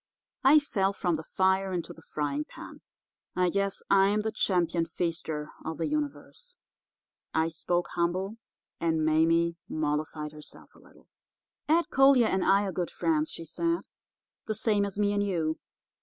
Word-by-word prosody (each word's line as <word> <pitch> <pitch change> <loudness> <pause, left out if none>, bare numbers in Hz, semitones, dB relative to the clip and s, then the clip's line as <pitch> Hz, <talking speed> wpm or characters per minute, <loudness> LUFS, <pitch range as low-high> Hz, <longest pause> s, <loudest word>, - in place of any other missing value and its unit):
I 275 +3 +7
fell 200 -10 +1
from 180 -4 0
the 160 - -5
fire 190 +2 +1
into 175 -3 -3
the 165 - -16
frying 150 -2 -2
pan. - - -12 0.5
I 180 -1 +2
guess 200 0 -1
I'm 200 +2 +4
the 220 +1 -2
Champion 175 -5 +1
Feaster 160 -3 -3
of 160 -1 -4
the 165 - -1
Universe.' 300 - -4 0.8
I 160 +1 +2
spoke 175 +2 -1
humble, 185 +5 -1 0.4
and 160 -2 +1
Mame 165 +2 +3
mollified 150 0 -2
herself 150 0 -12
a - - -19
little. - - -21 0.6
"'Ed 335 +2 +3
Collier 270 -3 +6
and 190 -3 +1
I 195 +1 +4
are 195 - -2
good 180 -1 -2
friends,' 315 -1 0
she 165 - -7
said, 335 - -1 0.7
'the 215 - -1
same 210 -1 +2
as 200 -1 -6
me 205 -1 +2
and 205 - +1
you. 165 -6 -1
185 Hz, 155 wpm, -28 LUFS, 160-210 Hz, 0.8 s, I